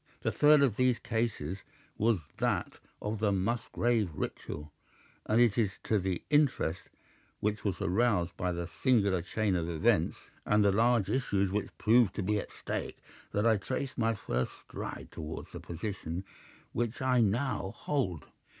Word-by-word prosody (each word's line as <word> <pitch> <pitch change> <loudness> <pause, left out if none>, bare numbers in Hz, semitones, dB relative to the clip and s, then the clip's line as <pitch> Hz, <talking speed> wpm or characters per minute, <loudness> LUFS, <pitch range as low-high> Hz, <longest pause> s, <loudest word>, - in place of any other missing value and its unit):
The - - 0
third 150 -1 +6
of 120 -7 +2
these 125 -2 +3
cases 105 -6 -2 0.4
was 115 0 +3 0.2
that - - 0 0.2
of 105 0 -2
the 105 -1 +2
Musgrave 115 +1 +1
Ritual, 75 +1 -5 0.6
and 110 +2 +3
it 120 -3 +4
is 105 -4 +2
to 110 - +2
the 95 -2 -2
interest 140 - +2 0.6
which 105 0 -1
was 95 -4 -1
aroused 95 -2 +1
by 90 0 -1
that 85 0 -4
singular 100 - +2
chain 100 +2 0
of 85 -1 -1
events, 80 -2 +2 0.3
and 105 0 +3
the 100 - +5
large 115 0 +3
issues 100 -7 +1
which 105 0 -3
proved 115 -2 +4
to 105 - -2
be 105 +2 +1
at - - -7
stake, - - -4 0.3
that 105 +2 0
I 110 -2 +5
trace 130 +6 -3
my 115 -1 +1
first 65 - -2
stride - - -7
towards 80 0 -7
the - - -7
position 85 -1 -5 0.5
which 120 0 -1
I 130 -2 +3
now 115 -1 +1
hold. 95 - -1
105 Hz, 160 wpm, -31 LUFS, 95-120 Hz, 0.6 s, third